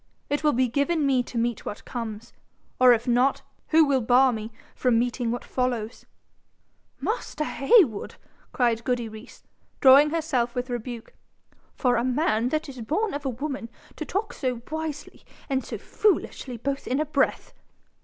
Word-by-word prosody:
It 290 +1 0
will 300 -1 +3
be 255 +1 +2
given 285 +5 0
me 265 -2 +3
to 245 0 -7
meet 235 -1 -1
what 205 - -7
comes; 230 -3 -6 0.5
or 255 0 +8
if 235 0 +2
not, 250 +3 +2 0.2
who 320 0 +5
will 275 -2 +2
bar 250 +2 +4
me 220 0 -5 0.2
from 250 -3 +2
meeting 240 0 0
what 240 +1 -3
follows 245 -3 -3 0.4
?' - - -44
'Master 335 - -3
Heywood,' 300 - +3 0.4
cried 235 -2 +1
goody 245 -2 -1
Rees, 220 +2 -12 0.4
drawing 275 +3 +7
herself 285 -7 -1
with 250 0 -3
rebuke, 240 -1 -6 0.6
'for 250 -2 +2
a 235 - +1
man 250 -3 +1
that 310 +3 -1
is 260 -3 -8
born 390 - -1
of 285 0 -5
a - - +1
woman 265 -1 -5 0.3
to - - -5
talk 400 +7 -3
so 250 -3 -3
wisely 315 -2 -5 0.2
and 265 -2 -1
so - - -6
foolishly 275 - -1
both 275 +4 -3
in 260 +3 0
a 305 - +1
breath! 285 -2 0
255 Hz, 165 wpm, -25 LUFS, 235-295 Hz, 0.6 s, or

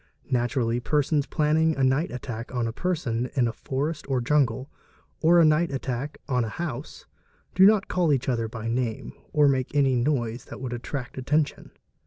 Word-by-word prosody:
Naturally 120 -1 +1
persons 145 +2 +1
planning 155 +1 +2
a 135 - +1
night 135 +6 +2
attack 120 -2 -6
on 120 -1 0
a 115 - -4
person 125 -8 -1
in 125 -4 +3
a 115 - -3
forest 140 +4 -3
or 130 -2 +1
jungle, 130 -1 +1 0.5
or" 170 +1 +6
night 155 +2 +3
attack 135 +1 -4
on 125 -4 +1
a 110 - -3
house, 145 0 -6 0.5
do 190 +1 +7
not 210 -2 +3
call 180 -2 +1
to 150 - +4
each 130 -2 -1
other 115 -3 0
by 110 0 -6
name 115 -1 -2 0.2
or 150 -1 +4
make 135 0 0
an 135 -4 +3
noise 120 -4 -1
that - - -9
would 130 -2 -4
attract 130 +2 -5
attention. 150 +3 0
135 Hz, 180 wpm, -26 LUFS, 120-150 Hz, 0.5 s, do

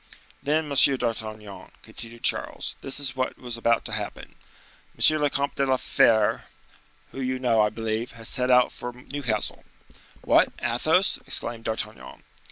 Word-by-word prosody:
"Then, 155 +2 0
Monsieur 140 -1 +4
d'Artagnan," 110 -4 -5
continued 115 0 -6
Charles, - - 0
"this 135 - 0
is 135 -2 -1
what 130 0 -2
was 120 -2 -5
about 115 0 +1
to - - -5
happen: - - -5 0.6
M. 155 -1 +5
le 145 - +3
Comte 140 0 -2
de 140 - +2
la 130 0 +3
Fere, 110 -2 +3 0.7
who 135 - -6
you 130 0 -1
know, 120 -4 +2
I 105 - +3
believe, 110 +2 -3
has 115 -1 -4
set 125 -1 0
out 125 -1 +5
for 125 0 -7
Newcastle." 125 -3 -3 0.6
"What, - - +4
Athos!" - - +2
exclaimed 115 -1 -1
D'Artagnan. 65 - -5
120 Hz, 155 wpm, -25 LUFS, 115-130 Hz, 0.7 s, M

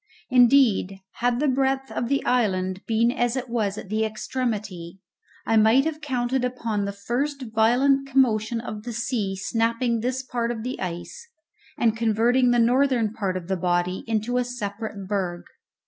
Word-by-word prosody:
Indeed, 245 -6 +4 0.2
had 245 0 +1
the 300 - +1
breadth 270 0 0
of 240 - -2
the 275 0 0
island 190 -6 0
been 230 +1 +2
as 240 -1 0
it 255 -1 -4
was 215 -4 -1
at 195 - -8
the 215 +1 0
extremity 215 -6 -4 0.5
I 225 - +2
might 220 +6 +5
have 315 -1 -3
counted 255 -3 -1
upon 230 -5 -2
the 200 - -2
first 260 +8 -3
violent 265 +5 +3
commotion 235 -4 +2
of 215 -3 -6
the 240 +2 -6
sea 225 -4 -2
snapping 230 +4 0
this 255 +3 -2
part 240 -2 -2
of 230 -2 -4
the 255 +2 -4
ice, 185 - -6 0.5
and 225 -2 +2
converting 230 +3 +2
the 245 - +3
northern 240 -2 +2
part 195 -5 -2
of 175 -2 -8
the 190 0 -1
body 180 +1 0
into 225 +3 0
a - - +1
separate 215 -4 -5
berg. 185 -4 -2
230 Hz, 165 wpm, -24 LUFS, 205-250 Hz, 0.5 s, might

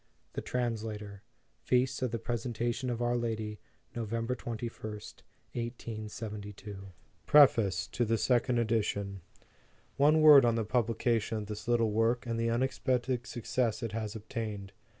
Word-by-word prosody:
THE - - -3
TRANSLATOR. 110 -4 -3 0.4
Feast 130 +1 +1
of 130 - +1
the 115 - -2
Presentation 120 +2 -2
of 120 0 -2
our 120 0 +1
Lady, 110 -3 -2 0.4
Nov. 115 -3 -3
21st, 115 -2 -4 0.3
1872. 105 -4 -6 0.4
PREFACE 120 -9 +5
TO 120 - -2
THE 115 0 +1
SECOND 125 +1 +2
EDITION. 100 -4 0 0.8
ONE 150 +3 +5
word 150 -3 +9
on 120 -1 +3
the 115 -2 0
publication 115 0 0
of 105 - -4
this 105 +1 -7
little 115 -2 +2
work, 115 +3 +1
and 115 -1 -2
the 115 0 +1
unexpected 125 0 0
success 120 -1 -1
it 115 - -2
has 110 0 -4
obtained. 105 -3 -5
115 Hz, 130 wpm, -31 LUFS, 110-120 Hz, 0.8 s, word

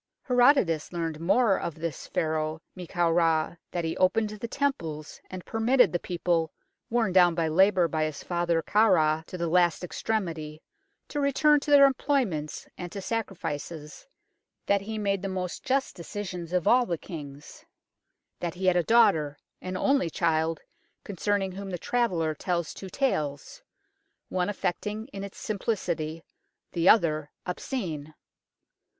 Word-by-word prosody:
Herodotus 245 - +3
learnt 165 -3 -3
more 195 +4 +3
of 170 - -4
this 160 -2 -5
Pharaoh 155 0 -1
Men 180 -2 -8
kau 175 -1 +1
Ra 165 -1 +2
that 175 -2 -3
he 160 - -2
opened 210 +3 +2
the 215 +2 -6
temples, 165 - -3
and 185 -1 -8
per 225 - -4
mitted 240 -4 +4
the 175 - +1
people, 170 -2 -1 0.4
worn 225 -5 +1
down 175 -2 +5
by 165 -1 +1
labour 185 +2 +4
by 155 -1 0
his 155 -2 -5
father 170 -2 0
Khafra 160 -8 +3
to 185 - -7
the 170 -1 -1
last 175 +1 +2
extremity, 165 -6 -3 0.5
to 295 - -3
return 290 +1 +4
to 285 - -7
their 285 -1 +8
employments 250 - 0
and 175 -1 -6
to 200 - -5
sacrifices; 170 - -5 0.6
that 200 -1 +2
he 220 +2 -5
made 200 -2 0
the 195 - -3
most 185 -1 -4
just 265 -3 0
decisions 175 -1 -6
of 180 -2 0
all 250 0 +5
their 170 - -1
kings. 145 -4 -10 0.8
That 175 0 -3
he 185 +1 -4
had 185 -1 +4
a 175 - +4
daughter, 160 -8 +3 0.2
an 185 0 -4
only 275 -5 +2
child, 160 -1 0 0.4
concerning 200 0 -1
whom 195 +1 -7
the 180 - -3
traveller 175 -7 0
tells 170 0 -2
two 190 - -9
tales, 150 - -2 0.7
one 180 +1 0
affecting 210 +4 -3
in 195 -6 -7
its 200 - -8
simplicity, 170 -7 -3 0.5
the 170 +1 +3
other 155 -8 +3 0.2
obscene. 170 - -4
180 Hz, 150 wpm, -27 LUFS, 160-210 Hz, 0.8 s, their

